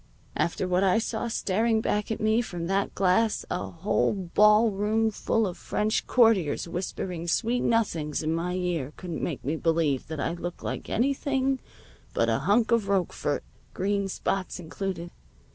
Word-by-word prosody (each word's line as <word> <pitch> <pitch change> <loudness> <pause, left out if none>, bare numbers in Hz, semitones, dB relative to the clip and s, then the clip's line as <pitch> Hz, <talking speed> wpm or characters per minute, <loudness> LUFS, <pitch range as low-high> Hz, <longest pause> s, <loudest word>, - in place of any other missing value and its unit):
After 175 +2 0
what 180 +1 +2
I 190 0 +4
saw 225 +1 -2
staring 220 +1 +1
back 210 -1 -1
at 225 - -2
me 220 +2 +3
from 175 -7 -5
that 195 +3 0
glass 200 +4 +2
a 180 - -2
whole 170 +5 +1 0.2
ballroom 210 +1 +4
full 225 +1 0
of 185 -2 -5
French 215 +1 -1
courtiers 220 - +3
whispering 175 0 -4
sweet 235 +8 +1
nothings 165 -11 0
in 155 +1 0
my 175 +2 -1
ear 170 -6 -2
couldn't 175 -3 -5
make 155 - -3
me 150 +4 0
believe 160 -5 +1
that 160 -1 -5
I 155 - -1
look 175 0 -6
like - - -4
anything 270 +1 +1 0.6
but 115 - +2
a 115 - +2
hunk 210 - +2
of 230 -4 +3
Roquefort, 185 -6 0 0.3
green 200 +1 0
spots 190 -1 -2
included. 175 0 -5
195 Hz, 160 wpm, -27 LUFS, 170-220 Hz, 0.6 s, I